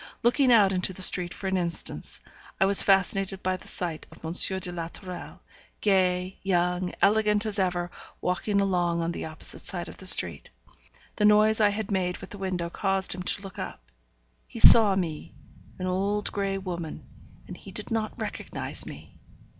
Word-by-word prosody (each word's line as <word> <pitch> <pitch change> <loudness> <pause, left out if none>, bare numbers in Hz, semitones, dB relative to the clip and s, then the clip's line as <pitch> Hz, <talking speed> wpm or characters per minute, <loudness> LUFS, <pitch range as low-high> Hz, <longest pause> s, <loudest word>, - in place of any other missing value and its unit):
Looking 250 +2 +3
out 205 -5 +5
into 185 0 -1
the 185 - -2
street 180 -1 +4
for - - -9
an 190 0 0
instant, 170 -2 -2 0.4
I 190 - +4
was 195 0 +6
fascinated 195 0 +1
by 185 0 0
the 185 - -11
sight 170 -4 -3
of - - -14
M. 160 - -4 0.3
de 180 -1 -4
la 170 -2 -5
Tourelle, 180 +1 -9 0.4
gay, 185 -2 0
young, 180 -1 0
elegant 210 +1 +3
as 210 -2 -3
ever, 180 -2 -1 0.3
walking 200 +3 -1
along 175 -3 0
on 165 - -2
the - - -6
opposite 155 0 -2
side 175 -2 -3
of - - -11
the 190 - -3
street. - - +2 0.7
The 210 - +2
noise 215 +1 +4
I 210 - +5
had 210 0 -4
made 180 -2 -1
with - - -12
the 205 - -9
window 185 -3 -3
caused 195 +1 -1
him 180 - -7
to 190 +2 -2
look 195 - -9
up; - - -8 0.6
he - - -11
saw 210 -4 +9
me, 165 -5 -4 0.4
an 185 - -5
old 200 +3 -1
grey 195 -1 -2
woman, 175 -4 -7 0.4
and - - -9
he - - -13
did - - -8
not 220 -1 -3
recognize - - -3
me! - - -12
190 Hz, 180 wpm, -26 LUFS, 180-200 Hz, 0.7 s, saw